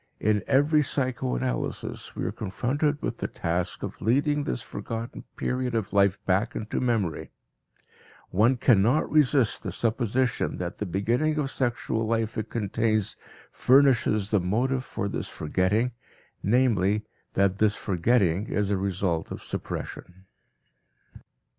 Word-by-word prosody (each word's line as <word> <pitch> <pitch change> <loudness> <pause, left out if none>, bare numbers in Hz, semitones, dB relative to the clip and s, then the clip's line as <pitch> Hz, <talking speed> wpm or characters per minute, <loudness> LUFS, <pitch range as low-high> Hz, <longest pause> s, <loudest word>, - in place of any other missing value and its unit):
In 105 -1 +2
every 150 +3 +4
psychoanalysis 130 -2 -2
we - - -3
are - - -1
confronted 140 +9 -1
with - - -3
the - - -2
task 85 +2 -2
of - - -6
leading 145 +6 +2
this - - -2
forgotten 115 +3 -6
period 125 -1 -1
of 105 -4 -2
life 100 -1 +4
back 95 +3 +1
into 110 - -3
memory; 115 - -1 1.0
one 115 +7 +3
cannot 120 +4 +3
resist 140 -5 +3
the - - -4
supposition 120 +2 0
that 90 +1 -5
the 105 - -2
beginning 120 - 0
of 140 -3 -1
sexual 120 -3 -1
life 115 0 -1
it 110 - -3
contains 110 -1 0 0.4
furnishes 125 -6 +3
the 105 - +4
motive 125 +8 0
for 110 -5 -4
this - - -3
forgetting, 95 +10 0 0.5
namely, 105 -3 +2 0.3
that 100 0 +2
this 110 -1 +3
forgetting 100 0 +1
is 105 -1 0
a 100 - +2
result 95 -4 -1
of - - -7
suppression. 95 +1 -6
110 Hz, 130 wpm, -26 LUFS, 100-130 Hz, 1.0 s, every